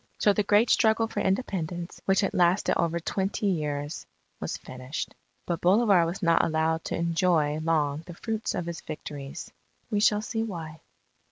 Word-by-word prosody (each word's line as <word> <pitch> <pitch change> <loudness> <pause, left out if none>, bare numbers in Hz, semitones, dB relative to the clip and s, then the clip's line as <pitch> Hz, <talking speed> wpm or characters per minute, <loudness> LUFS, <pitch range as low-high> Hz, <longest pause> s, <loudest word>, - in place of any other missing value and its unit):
So 205 - +4
the 210 - +1
great 205 +3 +3
struggle 225 0 +4
for - - -4
Independence, 180 -4 -2
which 195 0 +3
had 195 - 0
lasted 180 +2 +3
over 170 0 0
twenty 195 +4 -2
years, 150 -5 -2 0.3
was - - -3
finished. 130 +2 -6 0.3
But 170 -2 -2
Bolivar 190 -2 +4
was 180 +4 -5
not 170 -1 +4
allowed 160 0 +1
to - - -2
enjoy 165 -3 +1
long 155 -2 0
the 175 - -8
fruits 220 +3 -3
of 175 - -2
his 170 -1 -5
victories. 145 +1 -7 0.4
We 210 - +2
shall 210 0 +3
see 225 -1 -2
why. 165 -8 -5
170 Hz, 165 wpm, -27 LUFS, 160-200 Hz, 0.4 s, So